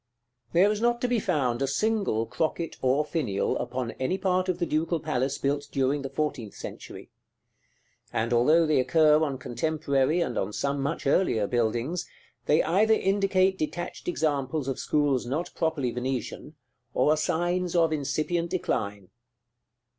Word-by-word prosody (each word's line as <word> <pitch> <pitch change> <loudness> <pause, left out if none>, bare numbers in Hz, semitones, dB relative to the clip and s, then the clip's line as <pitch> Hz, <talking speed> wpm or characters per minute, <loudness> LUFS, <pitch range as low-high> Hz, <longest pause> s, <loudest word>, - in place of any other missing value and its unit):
§ - - -56 0.5
XIV. - - -31
There 190 +5 +5
is 215 0 -2
not 240 0 +2
to 250 - +1
be 245 -2 +1
found 140 - 0
a 135 - +1
single 195 - 0
crocket 160 +5 -2
or 135 +3 +2
finial 125 - -1
upon 125 -2 -3
any 130 +9 0
part 185 -1 0
of 180 - 0
the 175 - 0
Ducal 165 +1 0
Palace 140 -3 -1
built 145 +1 -1
during 140 +1 +1
the 135 - -5
fourteenth 135 -6 -3
century; - - -9 1.0
and 115 +2 -1
although 155 +8 +4
they 155 -3 +2
occur 155 +2 +4
on 140 -4 -1
contemporary, 140 +4 0
and 170 - -1
on 100 +2 -3
some 140 +3 -1
much 140 +4 -3
earlier, 135 - +2
buildings, 120 - -1 0.4
they 150 - +4
either 215 +6 +3
indicate 195 -1 +2
detached 175 +3 -4
examples 150 -4 -1
of 135 - -2
schools 145 -5 +1
not 160 +8 -2
properly 155 -6 -1
Venetian, 125 0 -4 0.4
or 150 - +3
are - - +4
signs 175 +2 -1
of 165 -2 +3
incipient 155 +4 -1
decline. 100 - -2
150 Hz, 160 wpm, -27 LUFS, 130-175 Hz, 1.0 s, There